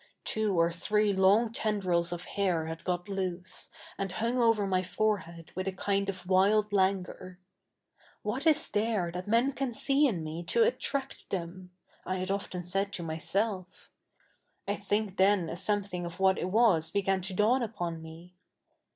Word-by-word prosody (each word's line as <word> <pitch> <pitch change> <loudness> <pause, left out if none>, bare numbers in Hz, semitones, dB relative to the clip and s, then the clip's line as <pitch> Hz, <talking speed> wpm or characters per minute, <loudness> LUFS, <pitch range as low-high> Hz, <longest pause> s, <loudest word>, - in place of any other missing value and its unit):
Two 210 -5 0
or 165 +1 +3
three 210 +4 +1
long 200 +4 +4
tendf'ils 185 -7 0
oj 175 0 -5
hair 180 -5 0
had 160 +1 -6
got 175 +1 -2
loose, 185 -2 -4 0.3
and 195 -2 -2
hung 235 +5 0
over 225 -3 +3
7)iy 185 -1 +1
forehead 180 -4 -2
with 185 +1 -4
a - - +1
kind 200 +1 -1
of 185 -2 -5
wild 200 +3 +3
laftguor. 190 -1 0 0.4
' - - -32
What - - -1
is 310 -2 +6
the7'e 210 -5 0
that 180 +2 -5
me7i 235 +6 +3
ca7i 265 -3 -3
see 280 +3 +3
in 180 -10 -2
77ie 160 +2 -6
to 465 - +4
attract 280 - -2
them? 180 0 -5
' - - -40
/ - - -34
had 185 +1 -2
often 190 -2 -3
said 195 +3 -1
to 175 - -4
77iyself 185 +4 -1 1.0
I 200 - +1
think 205 0 -2
the7i 190 -3 +3
a - - -4
something 190 -2 -2
of 170 +2 -8
what 190 0 +3
it 180 - -2
was 190 -7 +3
bega7i 195 -1 0
to 190 +1 -3
dawn 225 +7 +3
up07i 175 -8 -3
me. 165 +3 -12
190 Hz, 175 wpm, -30 LUFS, 180-210 Hz, 1.0 s, is